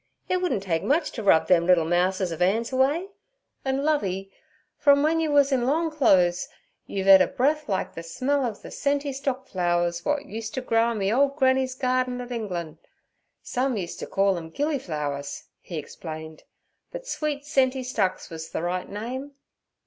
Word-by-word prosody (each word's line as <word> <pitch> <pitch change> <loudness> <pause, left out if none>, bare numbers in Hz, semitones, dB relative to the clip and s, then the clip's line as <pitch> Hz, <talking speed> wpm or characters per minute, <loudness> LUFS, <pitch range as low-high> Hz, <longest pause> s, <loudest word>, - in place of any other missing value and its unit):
It 365 - +1
wouldn' 360 - 0
take 165 -4 -1
much 300 +3 +1
t' 225 - -5
rub 195 -6 +4
them 170 -2 +4
liddle 175 -3 +5
mouses 180 +2 +1
of 165 - -5
'an's 220 +7 +2
away. 290 +9 +2 0.5
An', 265 +1 -1
Lovey, 195 -11 0 0.4
from 285 -1 +4
wen 320 +2 +2
yur 320 -1 0
wus 285 -1 +4
in 250 -2 +1
long 320 +4 +1
clo'es 185 - +3 0.4
you've 195 -1 -3
ed 190 -1 +9
a - - +4
breath 300 +3 0
like 190 -1 -1
ther 165 - -6
smell 260 +12 -1
ov 225 -5 -2
ther - - -9
scenty 285 0 -1
stock 265 -1 -3
flowers 175 -1 0
w'at 295 -1 -1
used 225 -4 -6
t' 260 - -2
grow 230 -1 +2
in 230 - -2
me 200 +1 0
old 275 +2 +3
granny's 260 -2 +2
garden 255 -1 0
at 245 0 -7
Englan'. 175 -9 -4 0.6
Some 255 -1 -1
used 175 -4 -5
t' - - -5
call 195 -1 +2
'em 165 -1 -9
gilly 290 - -1
flowers' 145 - -4 0.2
he 170 - -7
explained, 155 +1 -8 0.5
'but - - -7
sweet 305 - -3
scenty 265 -3 +1
stocks 195 -8 -1
wuz 160 0 -7
the - - -4
right 180 +1 -2
name. 255 +7 -5
240 Hz, 185 wpm, -25 LUFS, 180-280 Hz, 0.6 s, ed